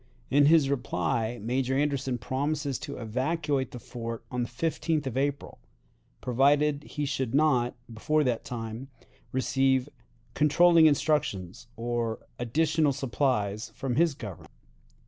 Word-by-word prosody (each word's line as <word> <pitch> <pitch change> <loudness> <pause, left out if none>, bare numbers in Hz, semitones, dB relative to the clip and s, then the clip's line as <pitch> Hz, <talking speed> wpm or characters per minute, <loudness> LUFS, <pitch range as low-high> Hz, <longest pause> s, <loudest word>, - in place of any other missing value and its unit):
In 145 +1 +5
his 155 -3 +5
reply 115 -2 -1
Major 130 +3 0
Anderson 140 -3 0
promises 140 +3 -2
to 140 - -6
evacuate 135 +4 -1
the - - -8
fort 115 -1 -7
on 125 -1 -1
the 120 - -2
15th 155 +3 -1
of 130 -3 -4
April, 140 +1 -2 0.6
provided 145 +3 +2
he 150 -1 -3
should 135 -3 -2
not, 135 -5 +3 0.2
before 150 +7 +1
that 125 -4 0
time, 115 +1 -6 0.4
receive 130 +1 +1 0.4
"controlling 165 +2 +5
instructions" 130 - 0
or 115 -1 -3
"additional 150 +4 +1
supplies" 120 -5 -1
from 130 -3 -2
his 165 0 +3
Government. 105 - -9
135 Hz, 125 wpm, -28 LUFS, 120-145 Hz, 0.6 s, In